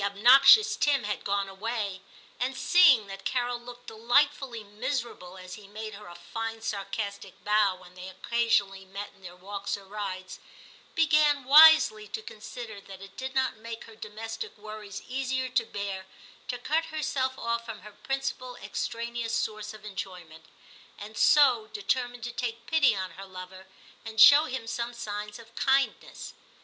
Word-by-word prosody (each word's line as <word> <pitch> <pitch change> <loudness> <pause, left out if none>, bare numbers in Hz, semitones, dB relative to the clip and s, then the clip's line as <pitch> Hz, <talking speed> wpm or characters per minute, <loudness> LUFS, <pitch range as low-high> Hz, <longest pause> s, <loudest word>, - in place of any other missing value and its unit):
obnoxious 250 - +6
Tim 280 -3 +2
had 210 0 -3
gone 200 0 -1
away, 200 -1 -4 0.4
and 260 +1 -2
seeing 275 - +6
that 195 0 -9
Carol 245 -1 -1
looked 245 0 -12
delightfully 245 +1 +1
miserable 215 -4 -5
as 185 0 -10
he 210 -2 -11
made 215 +1 -7
her 210 0 -11
a 175 - -11
fine 225 +6 -5
sarcastic 200 -1 -5
bow 210 -2 +3
when 180 -1 -16
they 180 0 -9
occasionally 195 -1 0
met 195 +2 -8
in 195 - -25
their 180 -1 -10
walks 200 +2 -5
or 200 - -14
rides, 190 -2 -6 0.6
began 300 -3 +3
wisely 295 -6 +7
to 215 +2 -6
consider 220 -1 -9
that 195 -1 -12
it 195 0 -13
did 260 +1 -6
not 260 -3 +1
make 230 +1 -8
her 225 - -14
domestic 220 +1 -7
worries 210 -1 -9
easier 260 0 -2
to 250 -3 0
bear 195 -2 -5 0.4
to 245 - -3
cut 315 +6 0
her 310 -1 -5
self 260 -2 -1
off 235 0 -2
from 225 -2 -8
her 210 - -12
principal 255 +1 -4
extraneous 235 -1 -4
source 215 -2 -3
of 215 0 -13
enjoyment, 180 -5 -8 0.5
and 210 +2 -10
so 245 -2 +5
determined 245 +4 -2
to 240 - -4
take 235 -1 -4
pity 285 -6 +3
on 185 -2 -4
her 195 +4 -10
lover, 185 0 -10 0.4
and 220 -1 -7
show 290 +6 +9
him 260 -5 -5
some 235 +1 -4
signs 210 -2 -6
of 230 -1 -16
kindness. 270 0 0
220 Hz, 160 wpm, -28 LUFS, 200-250 Hz, 0.6 s, show